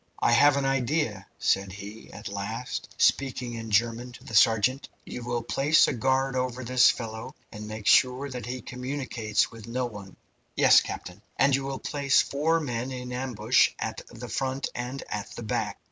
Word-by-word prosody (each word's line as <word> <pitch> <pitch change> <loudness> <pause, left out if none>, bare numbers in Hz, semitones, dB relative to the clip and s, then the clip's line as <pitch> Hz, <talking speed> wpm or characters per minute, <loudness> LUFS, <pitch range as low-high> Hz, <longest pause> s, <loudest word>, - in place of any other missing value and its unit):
"I - - +2
have 140 +4 +6
an 140 - 0
idea," 130 -6 0
said 95 0 +1
he, 105 +2 -10
at 105 0 -8
last, 100 +5 -5
speaking 125 -3 +1
in 115 -1 -6
German 115 +3 +1
to - - -13
the - - -10
sergeant. 115 +4 +3 0.2
"You 125 - -7
will 120 -1 -2
place 145 +6 +4
a - - 0
guard 130 +2 +1
over 130 0 -2
this 125 +1 +5
fellow, 110 -2 -4 0.2
and 105 -1 -8
make 110 -1 -7
sure 130 +5 +4
that 125 -3 -6
he 125 -1 -5
communicates 125 -4 -2
with 115 -1 -11
no 125 +2 -1
one." 100 -5 -9 0.4
"Yes, - - +7
captain." 90 +3 -7 0.2
"And 140 -1 +4
you 135 0 -2
will 135 -1 -3
place 140 -1 +1
four 160 +4 +1
men 125 -4 -3
in 125 -1 -6
ambush 125 -2 +2
at - - -4
the - - -9
front 135 0 -2
and 125 +3 -5
at 105 -1 -4
the 120 - -6
back. 110 - -2
125 Hz, 180 wpm, -27 LUFS, 110-135 Hz, 0.4 s, Yes